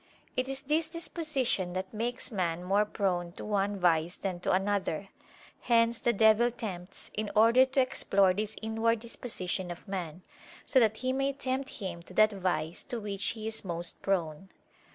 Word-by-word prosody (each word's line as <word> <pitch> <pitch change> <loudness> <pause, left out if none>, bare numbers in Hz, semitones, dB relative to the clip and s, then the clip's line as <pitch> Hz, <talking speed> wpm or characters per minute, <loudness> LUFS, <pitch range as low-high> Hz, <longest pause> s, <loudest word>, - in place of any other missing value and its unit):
It 255 0 0
is 270 0 -3
this 310 +3 0
disposition 300 - -1
that 185 +2 -4
makes 240 +4 -3
man 175 -4 -1
more 200 +3 +2
prone 180 -5 -1
to - - -8
one 205 -1 0
vice 170 -1 +2
than 185 -3 -3
to - - -1
another: 195 -1 0 0.5
hence 230 -1 +3
the 240 - +2
devil 220 +2 +5
tempts, 195 -6 -7
in 215 0 -2
order 230 +4 +6
to 270 +1 +2
explore 200 -6 +3
this 210 +2 -3
inward 225 +1 +1
disposition 205 -5 -4
of 175 +4 -8
man, 180 -3 -5 0.4
so 265 - +4
that 220 -2 +3
he 255 0 -1
may 270 +1 0
tempt 265 0 -2
him 185 -4 -6
to 180 +2 -14
that 215 0 +6
vice 180 -4 -2
to 240 - -4
which 205 -2 -3
he 215 - -6
is 220 0 -2
most 175 -2 +2
prone. 180 -2 -1
205 Hz, 175 wpm, -30 LUFS, 185-235 Hz, 0.5 s, order